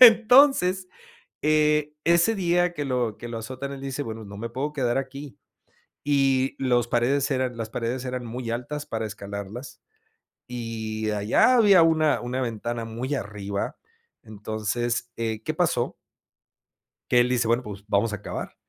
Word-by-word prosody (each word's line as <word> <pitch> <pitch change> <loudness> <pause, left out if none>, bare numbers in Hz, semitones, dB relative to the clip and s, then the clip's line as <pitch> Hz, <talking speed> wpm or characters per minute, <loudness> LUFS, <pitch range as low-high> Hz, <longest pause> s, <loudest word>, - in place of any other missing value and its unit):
entonces 225 -5 +7 0.5
e 150 0 +2
ese 170 +6 +4
día 175 -2 +1
que 145 - -3
lo 125 -5 -1
que 120 - -8
lo 115 - -4
azotan 130 +4 -6
él 135 - -7
dice 135 +1 -3
bueno 110 -3 -6
no 100 0 -9
me 115 +3 -5
puedo 140 +5 -3
quedar 125 -2 +1
aquí 135 +1 -6 0.7
y 135 -2 +2
los 120 -3 +2
paredes 135 +4 +1
eran 130 -2 -1
las 110 -1 -5
paredes 120 +3 -3
eran 125 -1 -4
muy 120 0 -4
altas 145 +5 -4
para 110 -5 -3
escalarlas 100 +4 -7 0.7
y 110 -2 -4
allá 105 - +4
había 200 -6 +7
una 155 -2 +3
una 125 +2 -3
ventana 115 0 -3
muy 120 +5 -3
arriba 100 -4 -4 0.5
entonces, 110 +3 -2
eh, 110 -1 -3
¿qué - - -1
pasó? - - 0 1.1
Que 125 - +5
él 120 +1 +3
dice 125 -2 +1
bueno, 120 +2 +2
pues, 100 -3 -8
vamos 105 +2 +1
a 105 - -5
cavar. - - -6
125 Hz, 155 wpm, -25 LUFS, 115-145 Hz, 1.1 s, entonces